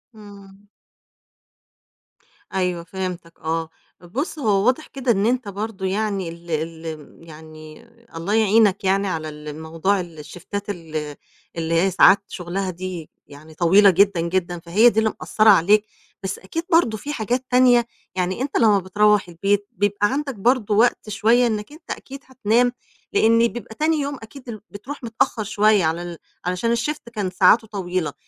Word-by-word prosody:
إمم. 200 Hz, -1 st, -15 dB, 1.9 s
أيوة، 180 Hz, -2 st, -1 dB
فهمتَك، 180 Hz, -1 st, -6 dB
آه. 160 Hz, 0 st, -2 dB, 0.3 s
بُص، 265 Hz, -, -4 dB
هو 205 Hz, -6 st, +2 dB
واضح 260 Hz, +5 st, +1 dB
كده 265 Hz, -3 st, -1 dB
إن 200 Hz, -1 st, +1 dB
أنت 245 Hz, -1 st, 0 dB
برضه 200 Hz, 0 st, -5 dB
يعني، 195 Hz, -2 st, -1 dB
ال 170 Hz, +1 st, -11 dB
ال 160 Hz, -1 st, -5 dB
يعني، 155 Hz, 0 st, -13 dB, 0.3 s
الله 170 Hz, +5 st, -3 dB
يعينك 215 Hz, -2 st, +3 dB
يعني 195 Hz, +1 st, +1 dB
على 160 Hz, -4 st, -3 dB
ال 150 Hz, 0 st, -9 dB
موضوع 165 Hz, +5 st, 0 dB
الـشيفتات 175 Hz, +4 st, -7 dB
ال 155 Hz, -5 st, -5 dB, 0.4 s
اللي 165 Hz, 0 st, -2 dB
هي 195 Hz, -, +2 dB
ساعات 195 Hz, +2 st, +6 dB
شغلها 185 Hz, +2 st, -4 dB
دي 180 Hz, -2 st, -6 dB, 0.2 s
يعني 150 Hz, +3 st, -14 dB
طويلة 190 Hz, +5 st, +5 dB
جدًا 195 Hz, -1 st, +3 dB
جدًا، 175 Hz, 0 st, -2 dB
فهي 190 Hz, +8 st, +4 dB
دي 220 Hz, -, 0 dB
اللي 220 Hz, -1 st, +1 dB
مأثّرة 215 Hz, 0 st, +3 dB
عليك 205 Hz, +3 st, +5 dB, 0.4 s
بس 190 Hz, +1 st, -4 dB
أكيد 325 Hz, +13 st, -5 dB
برضه 325 Hz, -10 st, +3 dB
فيه 290 Hz, +7 st, -6 dB
حاجات 245 Hz, +1 st, -2 dB
تانية 245 Hz, -2 st, +4 dB, 0.3 s
يعني، 185 Hz, +4 st, -1 dB
أنت 275 Hz, +1 st, -1 dB
لمّا 215 Hz, -4 st, +4 dB
بتروّح 210 Hz, +2 st, +2 dB
البيت 200 Hz, +4 st, 0 dB
بيبقى 205 Hz, +1 st, +1 dB
عندَك 280 Hz, -1 st, -2 dB
برضه 215 Hz, 0 st, +1 dB
وقت 225 Hz, 0 st, +2 dB
شوية 230 Hz, +3 st, +3 dB
إنَّك 215 Hz, +2 st, -3 dB
أنت 310 Hz, +3 st, -11 dB
أكيد 275 Hz, +1 st, -7 dB
هتنام، 245 Hz, -1 st, +1 dB, 0.4 s
لإن 230 Hz, +1 st, +4 dB
بيبقى 230 Hz, -1 st, -9 dB
تاني 315 Hz, +3 st, +1 dB
يوم 285 Hz, 0 st, -3 dB
أكيد 250 Hz, +3 st, -12 dB
ال 215 Hz, -3 st, -7 dB
بتروح 250 Hz, +8 st, -9 dB
متأخّر 225 Hz, -1 st, -1 dB
شوية 210 Hz, -2 st, +3 dB
على 160 Hz, +2 st, -1 dB
ال 175 Hz, -1 st, -7 dB, 0.3 s
علشان 180 Hz, +6 st, 0 dB
الshift 240 Hz, +2 st, -4 dB
كان 205 Hz, -4 st, -2 dB
ساعاته 195 Hz, +5 st, +4 dB
طويلة، 185 Hz, -5 st, -3 dB
200 Hz, 155 wpm, -22 LUFS, 175-225 Hz, 1.9 s, ساعات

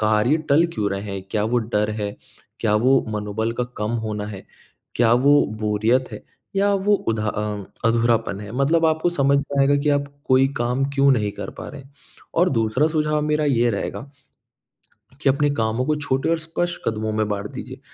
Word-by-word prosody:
कार्य 110 Hz, +6 st, +3 dB
टल 160 Hz, +4 st, +5 dB
क्यों 105 Hz, -3 st, -1 dB
रहे 100 Hz, 0 st, -2 dB
हैं, 95 Hz, -1 st, -5 dB
क्या 105 Hz, 0 st, 0 dB
वो 120 Hz, +3 st, +1 dB
डर 110 Hz, -2 st, -1 dB
है? 100 Hz, 0 st, -3 dB, 0.5 s
क्या 105 Hz, -2 st, +2 dB
वो 130 Hz, +4 st, +3 dB
मनोबल 105 Hz, +1 st, -2 dB
का -, -, +1 dB
कम 105 Hz, +2 st, -1 dB
होना 105 Hz, -1 st, -3 dB
है, 100 Hz, -3 st, -9 dB, 0.5 s
क्या 115 Hz, -1 st, +4 dB
वो 140 Hz, +4 st, +5 dB, 0.2 s
बोरियत 110 Hz, +5 st, +1 dB
है -, -, -8 dB, 0.3 s
या 200 Hz, +1 st, +3 dB
वो 200 Hz, +1 st, +2 dB
उधा 110 Hz, -1 st, 0 dB
अ, 105 Hz, -1 st, -3 dB, 0.2 s
अधूरापन 115 Hz, -3 st, +1 dB
है। 105 Hz, 0 st, -8 dB
मतलब 155 Hz, +6 st, +2 dB
आपको 160 Hz, +2 st, +1 dB
समझ 140 Hz, -4 st, +2 dB
में 140 Hz, 0 st, -1 dB
आएगा 140 Hz, +1 st, +4 dB
कि 150 Hz, -, 0 dB
आप 145 Hz, 0 st, +2 dB, 0.2 s
कोई 130 Hz, +1 st, +5 dB
काम 125 Hz, +3 st, 0 dB
क्यों 140 Hz, 0 st, +4 dB
नहीं 105 Hz, -5 st, 0 dB
कर -, -, -6 dB
पा -, -, -6 dB
रहे। 145 Hz, -1 st, -9 dB, 0.5 s
और 180 Hz, +2 st, +3 dB
दूसरा 115 Hz, +4 st, +1 dB
सुझाव 150 Hz, -1 st, 0 dB
मेरा 150 Hz, 0 st, +1 dB
ये 120 Hz, -4 st, +2 dB
रहेगा 115 Hz, +6 st, -4 dB, 1.1 s
कि -, -, +3 dB
अपने 145 Hz, +2 st, +2 dB
कामों 115 Hz, 0 st, 0 dB
को 155 Hz, -, +2 dB
छोटे 135 Hz, -2 st, -1 dB
और 165 Hz, -, +2 dB
स्पष्ट 170 Hz, +2 st, -3 dB
कदमों 110 Hz, 0 st, -1 dB
में 110 Hz, 0 st, 0 dB
बाँट 100 Hz, -1 st, -3 dB
दीजिए। -, -, -8 dB
120 Hz, 190 wpm, -22 LUFS, 105-145 Hz, 1.1 s, टल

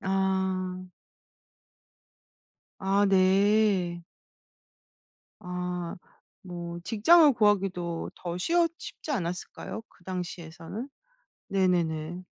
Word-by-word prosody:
아. 190 Hz, -1 st, 0 dB, 2.0 s
아 195 Hz, +1 st, +3 dB
네. 190 Hz, -2 st, +3 dB, 1.4 s
아. 180 Hz, -1 st, -4 dB, 0.5 s
뭐 175 Hz, -1 st, -6 dB
직장을 295 Hz, -, +6 dB
구하기도 195 Hz, -6 st, +1 dB
더 175 Hz, 0 st, -5 dB
쉬웠 335 Hz, -, +2 dB
쉽지 310 Hz, -, -8 dB
않았을까요? 180 Hz, -1 st, -4 dB
그 -, -, -25 dB
당시에서는? 180 Hz, -, -6 dB, 0.6 s
네네네. 175 Hz, -3 st, 0 dB
185 Hz, 150 characters per minute, -28 LUFS, 175-200 Hz, 2.0 s, 직장을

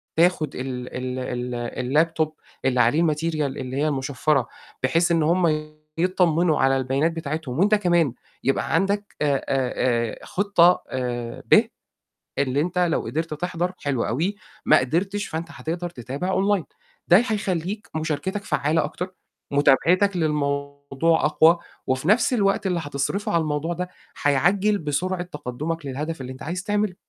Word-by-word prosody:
تاخُد 165 Hz, -3 st, +2 dB
ال 125 Hz, -1 st, -4 dB
ال 125 Hz, -1 st, -3 dB
ال 125 Hz, +5 st, +1 dB
الlaptop 160 Hz, -2 st, -1 dB, 0.4 s
اللي 125 Hz, -2 st, +3 dB
عليه 135 Hz, +9 st, +3 dB
الmaterial 155 Hz, 0 st, 0 dB
اللي 135 Hz, -2 st, -3 dB
هي 150 Hz, +2 st, +2 dB
المُشفّرة، 140 Hz, -1 st, 0 dB, 0.4 s
بحيث 165 Hz, +7 st, +2 dB
إن 165 Hz, -2 st, +3 dB
هُم 160 Hz, -2 st, +2 dB, 0.3 s
يتطمّنوا 175 Hz, -2 st, +2 dB
على 135 Hz, 0 st, +4 dB
البيانات 135 Hz, +5 st, +1 dB
بتاعتهم 155 Hz, -4 st, -4 dB
وأنت 210 Hz, +3 st, +5 dB
كمان 175 Hz, -, +2 dB, 0.3 s
يبقى 135 Hz, -, 0 dB
عندك 200 Hz, +4 st, 0 dB
آآ، 145 Hz, -2 st, +3 dB
آآ، 130 Hz, -2 st, 0 dB, 0.5 s
آآ -, -, -12 dB
خِطّة 180 Hz, -3 st, +3 dB
آآ، 120 Hz, -2 st, -4 dB
ب، -, -, +7 dB, 0.8 s
اللي 140 Hz, 0 st, +1 dB
أنت 180 Hz, +3 st, -1 dB
لو 175 Hz, -2 st, +2 dB
قِدرت 160 Hz, +1 st, -3 dB
تِحضَر 175 Hz, +2 st, -2 dB
حلو 135 Hz, -5 st, -1 dB
أوي، 170 Hz, -, -1 dB, 0.3 s
ما 155 Hz, -, +7 dB
قدرتش، 190 Hz, +10 st, -1 dB
فأنت 165 Hz, +1 st, -4 dB
هتقدَر 170 Hz, +2 st, -4 dB
تتابع 135 Hz, +5 st, -5 dB
online. 195 Hz, -2 st, +2 dB, 0.4 s
ده 175 Hz, -, +8 dB
ي -, -, +5 dB
هيخلّيك 200 Hz, -1 st, -2 dB
مُشاركتك 160 Hz, +6 st, -2 dB
فعّالة 155 Hz, -1 st, +1 dB
أكتر، 180 Hz, +5 st, -5 dB, 0.4 s
مُتابعتك 175 Hz, +8 st, +3 dB
للموضوع 140 Hz, 0 st, 0 dB
أقوى 160 Hz, +3 st, +5 dB, 0.3 s
وفي 130 Hz, +4 st, -1 dB
نَفْس 220 Hz, +5 st, +4 dB
الوقت 195 Hz, -3 st, +1 dB
اللي 180 Hz, -2 st, 0 dB
حتصرفه 145 Hz, +7 st, -2 dB
على 170 Hz, -, +3 dB
الموضوع 155 Hz, +2 st, -1 dB
ده 180 Hz, +1 st, -4 dB, 0.3 s
حيعجّل 190 Hz, +9 st, +2 dB
بسرعة 175 Hz, +4 st, -1 dB
تقدُّمك 165 Hz, -1 st, -5 dB
للهدف 150 Hz, +4 st, -4 dB
اللي 130 Hz, 0 st, -6 dB
أنت 130 Hz, -, -11 dB
عايز 175 Hz, +3 st, -4 dB
تعمله، 210 Hz, -2 st, 0 dB
160 Hz, 145 wpm, -24 LUFS, 140-180 Hz, 0.8 s, ده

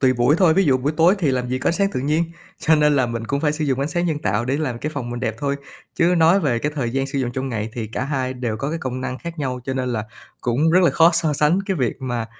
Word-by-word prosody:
tùy 130 Hz, -1 st, +4 dB
buổi 125 Hz, +4 st, +3 dB
thôi. 175 Hz, -4 st, +5 dB
Ví 195 Hz, +2 st, +3 dB
dụ 135 Hz, -3 st, +4 dB
buổi 140 Hz, +4 st, -1 dB
tối 170 Hz, +4 st, +5 dB
thì 160 Hz, -7 st, +1 dB
làm 125 Hz, -1 st, -1 dB
gì 130 Hz, -, -1 dB
có -, -, 0 dB
ánh -, -, +2 dB
sáng 195 Hz, +3 st, +1 dB
tự -, -, -2 dB
nhiên, 155 Hz, +5 st, +1 dB, 0.3 s
cho 160 Hz, -, +3 dB
nên 150 Hz, -1 st, +3 dB
là 130 Hz, -3 st, +3 dB
mình 115 Hz, -1 st, -4 dB
cũng 140 Hz, +3 st, -1 dB
phải 150 Hz, -1 st, +1 dB
sử 150 Hz, 0 st, -2 dB
dụng 135 Hz, -2 st, 0 dB
ánh 140 Hz, -, -1 dB
sáng 175 Hz, +1 st, -1 dB
nhân 155 Hz, -3 st, -1 dB
tạo 105 Hz, -3 st, -1 dB
để 130 Hz, +3 st, 0 dB
làm 130 Hz, -6 st, -2 dB
cái 150 Hz, -, -3 dB
phòng 125 Hz, -4 st, -4 dB
mình 120 Hz, 0 st, -5 dB
đẹp 110 Hz, -, -1 dB
thôi. 140 Hz, +1 st, -1 dB, 0.4 s
Chứ 175 Hz, +2 st, +3 dB
nói 165 Hz, +4 st, +5 dB
về 125 Hz, -9 st, +1 dB
cái 150 Hz, +5 st, -2 dB
thời 130 Hz, -6 st, -2 dB
gian 135 Hz, +2 st, -1 dB
sử 140 Hz, 0 st, -3 dB
dụng 125 Hz, -2 st, -1 dB
trong 130 Hz, +1 st, -3 dB
ngày 110 Hz, -2 st, -3 dB
thì 115 Hz, -2 st, -4 dB
cả 120 Hz, +4 st, -4 dB
hai 130 Hz, -2 st, -2 dB
đều 120 Hz, -3 st, -3 dB
có 140 Hz, +6 st, -3 dB
cái 165 Hz, -, -3 dB
công 130 Hz, -2 st, -4 dB
năng 130 Hz, 0 st, -4 dB
khác 170 Hz, +1 st, -8 dB
nhau, 130 Hz, -3 st, -3 dB
cho 130 Hz, -, -3 dB
nên 130 Hz, -1 st, -2 dB
là 110 Hz, -2 st, -2 dB, 0.4 s
cũng 135 Hz, +7 st, +1 dB
rất 180 Hz, -, +5 dB
là -, -, +5 dB
khó 165 Hz, +1 st, +5 dB
so 165 Hz, -2 st, +2 dB
sánh 150 Hz, +5 st, +2 dB
cái 195 Hz, -, -1 dB
việc 125 Hz, -7 st, -1 dB
mà, 120 Hz, -3 st, -3 dB
135 Hz, 320 wpm, -21 LUFS, 125-160 Hz, 0.4 s, thôi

